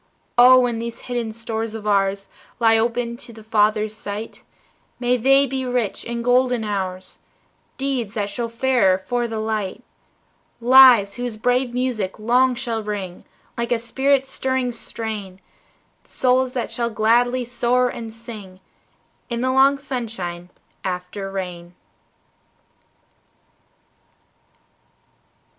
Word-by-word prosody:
Oh, 250 +1 +8
when 240 -2 0
these 235 0 -6
hidden 240 -3 -3
stores 225 0 -4
of 215 -1 -7
ours 195 -1 +1 0.3
Lie 225 -1 +5
open 235 +1 0
to 240 - -11
the 220 -1 -13
Father's 215 0 +1
sight, 210 +1 -7 0.6
May 245 0 +2
they 270 +3 +4
be 265 0 -3
rich 245 -5 -2
in 235 0 -4
golden 250 -1 +2
hours, 190 -3 -4 0.6
Deeds 260 -6 -2
that 205 -2 -2
show 235 +2 -3
fairer 230 -5 +2
for 240 +6 -2
the 225 -1 -5
light, 215 0 -3 0.8
Lives 245 -4 +7
whose 245 -3 -4
brave 245 +2 +1
music 245 -7 -2
long 245 +4 +3
shall 235 -3 -3
ring, 200 -4 -5 0.3
Like 235 +1 -3
a 240 - +3
spirit 265 +4 +1
stirring 260 -2 -1
strain, 215 -5 -6 0.6
Souls 255 0 +1
that 245 - -3
shall 235 -1 -1
gladly 240 +3 +2
soar 245 +1 +1
and 230 -2 -6
sing 215 -5 -10 0.7
In 235 -1 -2
the 260 +1 +1
long 270 +2 +4
sunshine 220 -10 -5 0.3
after 185 +2 -4
rain. 180 -2 -6
230 Hz, 120 wpm, -21 LUFS, 210-250 Hz, 0.8 s, Oh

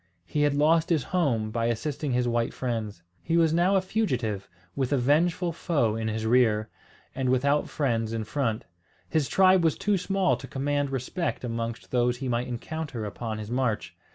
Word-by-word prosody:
He 150 - -1
had 145 -1 +3
lost 160 +3 +3
his 160 -6 +2
home, 125 -12 0
by 115 +1 0
assisting 140 +4 -2
his 125 0 +1
white 120 -1 0
friends. 110 -7 -3 0.2
He 165 0 0
was 165 -2 +4
now 175 +4 +3
a 190 - +4
fugitive, 125 - -1 0.3
with 130 -1 -1
a 140 - +3
vengeful 165 +7 +2
foe 140 -10 0
in 110 0 -2
his 110 0 -2
rear, 110 -2 +3 0.4
and 130 -1 -1
without 140 +3 +2
friends 115 -6 0
in 115 -1 -2
front. 115 -2 -2 0.4
His 150 -6 +1
tribe 185 -2 +5
was 160 -2 +2
too 205 -2 +1
small 195 0 +1
to 135 - -9
command 145 +1 -1
respect 135 +6 -3
amongst 115 -1 -4
those 125 -1 +2
he 135 +1 -4
might 120 0 -1
encounter 125 -1 -5
upon 110 +2 -4
his 110 +1 -7
march. 115 -9 -1
130 Hz, 180 wpm, -27 LUFS, 115-160 Hz, 0.4 s, tribe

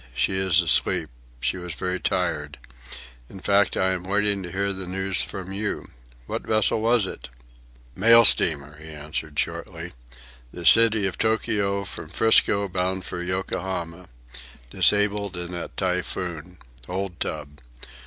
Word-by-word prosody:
"She - - +1
is 95 -1 +2
asleep. 85 -6 +1 0.3
She - - 0
was 90 -2 -6
very 90 0 -2
tired. 75 -6 -2 0.7
In 95 - -10
fact, 100 +1 +2
I 95 0 +2
am 90 -1 -3
waiting 100 +1 +1
to 90 -2 -7
hear 100 +1 -1
the 95 -1 -6
news 95 +1 -1
from 95 -1 -5
you. 100 +2 -4 0.3
What - - -4
vessel 110 0 +3
was 115 -2 +3
it?" 90 - -7 0.7
"Mail 115 +4 +7
steamer," 70 -4 +3
he 80 +1 -12
answered 75 0 -6
shortly. - - -4 0.6
"The 85 - -7
City 110 +1 +6
of 95 - -3
Tokio, 105 -3 0
from - - -8
'Frisco, 100 -2 +3
bound 95 0 -2
for 90 - -5
Yokohama. 90 -1 -4 0.6
Disabled 105 -2 +1
in 90 0 -5
that 85 -1 -7
typhoon. 90 -2 -3 0.3
Old 95 -1 -4
tub. 75 -2 -5
95 Hz, 140 wpm, -24 LUFS, 85-100 Hz, 0.7 s, Mail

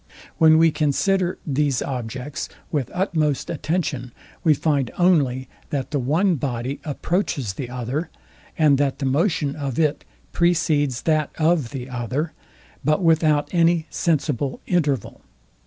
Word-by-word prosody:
When 160 -1 +7
we 165 0 +5
consider 180 +5 +1
these 140 -2 +1
objects 130 +4 -5 0.2
with 140 -6 -1
utmost 155 -7 0
attention, 150 -6 -2 0.3
we 155 -3 +5
find 140 -4 0
only 140 -8 +2 0.2
that 140 -2 -3
the 145 - 0
one 160 +8 +2
body 130 +1 -3
approaches 145 - -1
the 120 +5 -6
other; 125 +7 -3 0.5
and 150 -4 +4
that 140 -2 +1
the 140 - -3
motion 145 0 +1
of 140 -4 -4
it 155 -2 +1 0.3
precedes 155 -6 +1
that 155 -2 +1
of 160 -5 +2
the 130 -1 -6
other, 130 +5 -3 0.5
but 155 +6 +2
without 160 -2 +3
any, 170 -1 +3
sensible 140 -5 0
interval. 150 -7 0
150 Hz, 130 wpm, -22 LUFS, 135-165 Hz, 0.5 s, When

